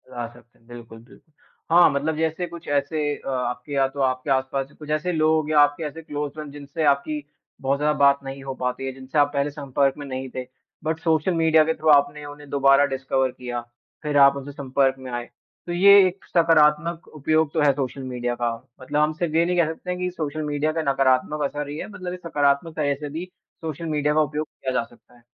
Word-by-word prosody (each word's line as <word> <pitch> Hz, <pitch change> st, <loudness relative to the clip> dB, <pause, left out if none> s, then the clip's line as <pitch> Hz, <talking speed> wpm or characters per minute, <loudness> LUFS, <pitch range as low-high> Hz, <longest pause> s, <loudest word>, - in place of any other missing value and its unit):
ला 120 Hz, -2 st, -5 dB
सकते 120 Hz, 0 st, -19 dB
हैं, 115 Hz, -, -29 dB
बिल्कुल, 120 Hz, -2 st, -11 dB
बिल्कुल 125 Hz, +6 st, -20 dB, 0.4 s
हाँ, 175 Hz, +1 st, +7 dB
मतलब 145 Hz, +3 st, -1 dB
जैसे 160 Hz, +2 st, -1 dB
कुछ 170 Hz, 0 st, -11 dB
ऐसे 145 Hz, +1 st, 0 dB
अ, -, -, -8 dB
आपके 125 Hz, +1 st, -3 dB
या 135 Hz, -1 st, +3 dB
तो 135 Hz, +1 st, -10 dB
आपके 130 Hz, +1 st, 0 dB
आस-पास 135 Hz, +1 st, 0 dB
कुछ 150 Hz, -1 st, -10 dB
ऐसे 155 Hz, +4 st, 0 dB
लोग 155 Hz, -1 st, +2 dB
या 150 Hz, -, +5 dB
आपके 145 Hz, +2 st, +3 dB
ऐसे 155 Hz, +2 st, -6 dB
क्लोज़ 145 Hz, -2 st, -4 dB
फ्रेंड 150 Hz, -2 st, -8 dB
जिनसे 145 Hz, +2 st, -5 dB
आपकी 145 Hz, +1 st, +1 dB, 0.4 s
बहुत 135 Hz, +1 st, 0 dB
ज़्यादा 150 Hz, 0 st, +1 dB
बात 140 Hz, 0 st, +5 dB
नहीं 135 Hz, 0 st, -7 dB
हो 135 Hz, 0 st, -4 dB
पाती 125 Hz, +1 st, -3 dB
है, 135 Hz, -, -2 dB
जिनसे 135 Hz, +3 st, -6 dB
आप 145 Hz, 0 st, +3 dB
पहले 140 Hz, 0 st, 0 dB
संपर्क 140 Hz, -1 st, 0 dB
में 145 Hz, -, -7 dB
नहीं 130 Hz, 0 st, -5 dB
थे, 130 Hz, -1 st, -4 dB, 0.4 s
बट 160 Hz, +1 st, -1 dB
सोशल 160 Hz, +2 st, +1 dB
मीडिया 160 Hz, -1 st, +4 dB
के 160 Hz, +1 st, 0 dB
थ्रू 155 Hz, 0 st, -1 dB
आपने 145 Hz, 0 st, +4 dB
उन्हें 145 Hz, 0 st, -11 dB
दोबारा 140 Hz, 0 st, +4 dB
डिस्कवर 135 Hz, -1 st, -1 dB
किया 125 Hz, -1 st, -5 dB, 0.4 s
फिर 150 Hz, -1 st, 0 dB
आप 140 Hz, 0 st, +7 dB
उनसे 140 Hz, +1 st, -7 dB
संपर्क 135 Hz, -1 st, +1 dB
में 130 Hz, -1 st, -8 dB
आए। 120 Hz, 0 st, -4 dB, 0.4 s
तो -, -, -3 dB
ये 190 Hz, +3 st, +6 dB, 0.2 s
एक 185 Hz, +2 st, -7 dB
सकारात्मक 165 Hz, 0 st, +3 dB
उपयोग 155 Hz, +1 st, +1 dB
तो 160 Hz, -, +1 dB
है, 145 Hz, -1 st, +5 dB
सोशल 135 Hz, 0 st, -4 dB
मीडिया 125 Hz, -1 st, -3 dB
का 120 Hz, -1 st, -1 dB, 0.3 s
मतलब 145 Hz, +3 st, -1 dB
हम 155 Hz, +1 st, +2 dB
सिर्फ़ 160 Hz, -1 st, -3 dB
ये 165 Hz, +1 st, +4 dB
नहीं 180 Hz, +1 st, 0 dB
कह 170 Hz, -3 st, +4 dB
सकते 180 Hz, -, -11 dB
हैं 180 Hz, 0 st, -2 dB
कि 180 Hz, 0 st, -1 dB
सोशल 155 Hz, -3 st, -4 dB
मीडिया 150 Hz, +1 st, 0 dB
का -, -, +1 dB
नकारात्मक 135 Hz, +2 st, +1 dB
असर 145 Hz, +1 st, -3 dB
ही 145 Hz, -, -5 dB
है, -, -, -5 dB
मतलब 185 Hz, -3 st, -6 dB
ये 180 Hz, -, -5 dB
सकारात्मक 145 Hz, +1 st, +1 dB
तरह 145 Hz, -2 st, +1 dB
से 145 Hz, +1 st, -7 dB
भी 160 Hz, +5 st, -5 dB, 0.4 s
सोशल 160 Hz, 0 st, -5 dB
मीडिया 150 Hz, -2 st, 0 dB
का 155 Hz, -, +4 dB
उपयोग 150 Hz, 0 st, -2 dB
किया 130 Hz, -, -5 dB
जा 120 Hz, -, +1 dB
सकता 120 Hz, +1 st, -20 dB
है। 120 Hz, -, -23 dB
145 Hz, 225 wpm, -23 LUFS, 135-155 Hz, 0.4 s, हाँ